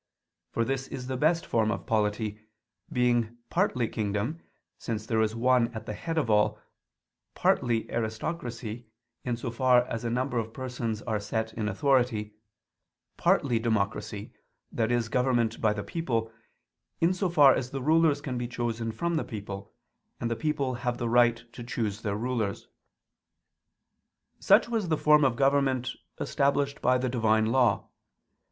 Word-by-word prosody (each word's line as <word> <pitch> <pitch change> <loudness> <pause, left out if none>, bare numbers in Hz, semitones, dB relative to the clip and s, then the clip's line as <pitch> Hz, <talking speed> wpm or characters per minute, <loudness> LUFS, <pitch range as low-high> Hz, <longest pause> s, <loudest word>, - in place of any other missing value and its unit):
For 115 - 0
this 135 +1 -2
is 125 - -6
the 130 0 -3
best 160 +5 +2
form 110 -2 +1
of - - -3
polity, 105 -1 0 0.5
being 120 -2 +1
partly 170 - +1
kingdom, 105 +9 -2 0.4
since 110 -2 -4
there 110 -1 +1
is 110 0 0
one 125 0 +3
at 110 0 -6
the 105 - -4
head 165 +9 -4
of 150 - +1
all; 105 -1 +2 0.8
partly 115 -2 +1
aristocracy, 115 0 -4 0.4
in 120 -2 -2
so 120 0 -4
far 125 +1 +4
as 115 -2 -4
a 120 - -1
number 125 +1 0
of 110 0 -5
persons 120 -5 -4
are 110 -3 -1
set 110 +2 -3
in 110 -2 -2
authority; 115 -2 +1 0.8
partly 120 -5 +2
democracy, 110 -2 -2 0.4
i.e. 120 +1 +2
government 120 -1 0
by 110 - +3
the 105 -1 -3
people, 115 - -2 0.7
in 170 +3 +3
so 185 0 -1
far 145 -5 +7
as 125 - -2
the 135 -1 -5
rulers 155 -1 +3
can 130 -4 -3
be 120 - -2
chosen 115 -1 -3
from 170 +9 -1
the - - 0
people, 100 -3 -7 0.5
and 115 - -2
the - - +1
people 140 0 -1
have 125 -1 -1
the 120 -1 -2
right 120 -1 +4
to 120 - -8
choose 110 -3 -3
their 100 -2 -2
rulers. 115 -3 -2 1.7
Such - - +5
was 225 -5 -1
the 160 -2 +1
form 150 0 +5
of 130 -3 +3
government 135 -1 +2 0.3
established 140 0 0
by 125 +1 +3
the 130 +1 -1
Divine 110 -3 +2
Law. 120 -2 +2
120 Hz, 155 wpm, -28 LUFS, 110-130 Hz, 1.7 s, far